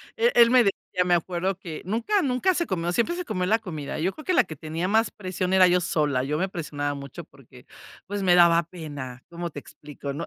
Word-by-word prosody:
E 470 +1 +3
él 235 -1 +7
me 255 - +6
decía, 195 -2 -1
me 180 - +2
acuerdo 180 +3 -1
que 170 -5 -8
nunca, 230 - 0
nunca 280 +7 +1
se 340 0 -1
comió, 175 -2 -1
siempre 235 - 0
se 360 - -5
comió 185 - -2
la 220 +4 +2
comida. 155 -8 -6
Yo 180 +5 0
creo 310 - -12
que 370 - +1
la - - +5
que 160 - -9
tenía 160 +4 -4
más 220 +3 +2
presión 185 -1 -3
era 185 -1 +7
yo 180 +1 +3
sola, 145 -6 0
yo 150 +3 -2
me 190 +3 -1
presionaba 145 -5 -3
mucho 140 -2 -8
porque, - - -18 0.4
pues, 205 0 -3
me 180 -1 +5
daba 170 -1 +6
pena, 145 -7 -8
¿cómo 170 0 -5
te 145 - -8
explico? 145 -1 -9
¿No? 165 +4 -5
180 Hz, 235 wpm, -25 LUFS, 155-205 Hz, 0.4 s, él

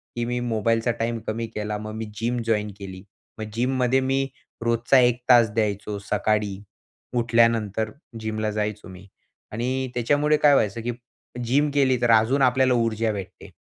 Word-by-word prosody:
की 120 0 -2
मी 120 +1 -2
मोबाईलचा 115 +2 +1
टाईम 115 0 -1
कमी 115 +1 -2
केला. 105 0 -3
मग 110 +1 -7
मी 110 0 -4
जिम 120 +1 -1
जॉइन 105 -2 0
केली. 95 -1 -8 0.4
मग 110 - -3
जिममध्ये 125 +2 +1
मी 135 0 +1 0.4
रोजचा 115 +3 +3
1 120 -1 +3
तास 120 -3 +6
द्यायचो. 105 -2 -1
सकाळी 105 0 -1 0.6
उठल्यानंतर 115 -2 +2 0.3
जिमला 110 -1 -2
जायचो 105 0 -3
मी. 95 +1 -12 0.4
आणि 130 +4 -2
त्याच्यामुळे 145 +5 +2
काय 145 -1 +7
व्हायचं 115 -3 +1
की 120 - -2 0.5
जिम 145 +5 +2
केली, 130 -3 +2
तर 120 -1 +3
अजून 115 +5 +4
आपल्याला 130 0 +3
ऊर्जा 115 -2 0
भेटते. 100 -3 -8
115 Hz, 155 wpm, -24 LUFS, 105-125 Hz, 0.6 s, काय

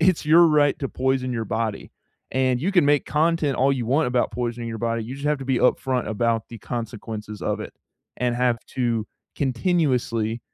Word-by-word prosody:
it's 165 -2 +2
your 165 +2 +7
right 150 -2 +3
to 135 - -2
poison 130 -1 0
your 115 -2 -3
body, 110 -1 -3 0.4
and 130 -1 +1
you 185 +6 0
can 175 -6 +4
make 145 -1 +3
content 155 -2 +1
all 135 +2 +3
you 125 -4 -2
want 140 +2 +2
about 125 0 +1
poisoning 120 -1 -3
your 115 - -5
body, 115 0 -1
you 125 - -6
just 140 +2 -5
have 150 -1 +1
to 135 - -7
be 130 -2 +1
upfront 125 -1 +1
about 115 +1 0
the 115 - -8
consequences 110 -3 -6
of - - -1
it, - - -7 0.5
and 120 -1 0
have 125 -2 +2 0.2
to 115 -4 0 0.3
continuously, 125 - 0
125 Hz, 195 wpm, -23 LUFS, 115-145 Hz, 0.5 s, your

